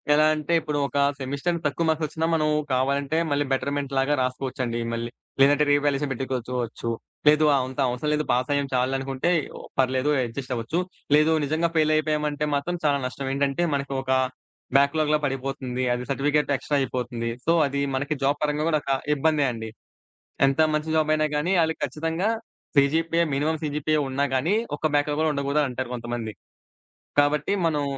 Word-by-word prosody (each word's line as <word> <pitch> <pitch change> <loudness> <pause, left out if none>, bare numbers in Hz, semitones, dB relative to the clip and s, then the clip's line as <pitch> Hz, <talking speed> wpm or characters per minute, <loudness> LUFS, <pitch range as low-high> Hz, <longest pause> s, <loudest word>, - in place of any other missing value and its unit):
ఎలా 155 +1 +5
అంటే 155 +2 -2
ఇప్పుడు 150 -2 -3
ఒక 145 - -5 0.2
సెమిస్టర్ 140 +6 -2
తక్కువ 155 +3 0
మార్క్స్ 160 0 +1
వచ్చినా 160 +2 -2
మనం 155 -1 +1 0.2
కావాలంటే 140 +3 +1
మళ్ళీ 145 0 +1
బెటర్‌మెంట్ 140 +1 -1
లాగా 135 +2 +2
రాసుకోవచ్చండి 125 -2 -2
మళ్ళీ. 115 0 -3 0.3
లేదంటే 145 +2 +5
రీవాల్యుయేషన్ 145 0 +2
పెట్టుకోచోవచ్చు. 125 -2 -3 0.4
లేదు 150 +1 +6
ఆహ్, 135 - +2
అంత 130 +2 -9
అవసరం 125 +5 -2
లేదు 150 0 +1
పాస్ 125 +2 +1
అయ్యాం 140 -1 0
చాల్లే 130 +1 +1
అనుకుంటే 135 +4 -2 0.5
పర్లేదు 130 +2 +2
అడ్జస్ట్ 125 +2 -5
అవ్వచ్చు. 115 +9 -2 0.4
లేదు 155 +2 +4
నిజంగా 160 +4 +1
ఫెయిల్ 155 -1 +3
అయిపోయామంటే 150 -1 0
మాత్రం 175 +5 -2
చాలా 145 -1 +3
నష్టం 135 +1 -4
ఏంటంటే 140 +4 +1
మనకు 140 0 -2
ఒక 130 0 -3 0.7
బ్యాక్‌లాగ్‌లా 150 +2 +2
పడిపోతుంది. 135 -2 -3
అది 125 0 -3
సర్టిఫికేట్ 145 +2 +1
ఎక్స్ట్రా 145 +2 -1
అయిపోతుంది. 120 -2 -3 0.2
సో 165 - +3 0.2
అది 140 0 -2
మనకి 145 +3 -1
జాబ్ 140 +2 +2
పరంగా 150 +1 0
కూడా 155 -2 +2
ఒక 135 - -2 0.2
ఇబ్బందే 150 0 +2
అండి. 110 -1 -6 0.8
ఎంత 135 +2 +1
మంచి 150 +1 -1
జాబ్ 155 -1 +2
అయినా 155 0 +2
గానీ 160 +6 0
ఆళ్ళకి 160 0 -1
ఖచ్చితంగా 165 +5 -1 0.5
సీజీపీఏ 165 +4 +3
మినిమమ్ 150 +3 0
సీజీపీఏ 150 +1 0
ఉన్నా 135 +2 0
కానీ 150 +10 +2 0.2
ఒక - - 0
బ్యాక్‌లాగ్ 145 0 0
కూడా 160 - +2
ఉండకూడదు 140 +1 +1
అనంటారు 130 -2 -4
కొంతమంది. 120 -2 -4 0.9
కాబట్టి 145 +2 +2 0.2
మనం 150 -3 0
140 Hz, 160 wpm, -25 LUFS, 130-150 Hz, 0.9 s, లేదు